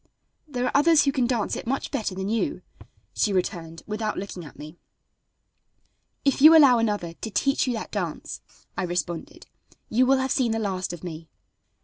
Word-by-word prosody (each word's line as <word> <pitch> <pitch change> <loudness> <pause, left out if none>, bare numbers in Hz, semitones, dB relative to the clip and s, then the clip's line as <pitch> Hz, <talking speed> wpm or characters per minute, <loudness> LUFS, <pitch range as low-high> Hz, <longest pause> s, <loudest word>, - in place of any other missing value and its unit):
"There 250 -4 -2
are - - 0
others 295 +1 +5
who 275 - +3
can 260 -3 +1
dance 235 -4 -1
it - - -7
much 270 +2 -2
better 205 -4 -2
than 190 +1 -3
you," 225 +2 -1 0.5
she 210 - +1
returned, 170 -3 -3
without 215 0 -3
looking 190 -2 -6
at 150 - -13
me. 155 +3 -11 1.5
"If 275 -1 +2
you 320 +2 +10
allow 265 -6 +7
another 205 -7 -1
to 220 - -7
teach 275 +5 +1
you 250 - 0
that 220 - -5
dance," - - -4 0.3
I - - -2
responded, 175 -1 -4 0.4
"you 250 +3 +3
will 270 +1 +4
have 265 0 -1
seen 240 -4 +1
the - - -1
last 190 -4 -2
of 175 -1 -9
me." 165 -2 -7
220 Hz, 180 wpm, -25 LUFS, 180-260 Hz, 1.5 s, you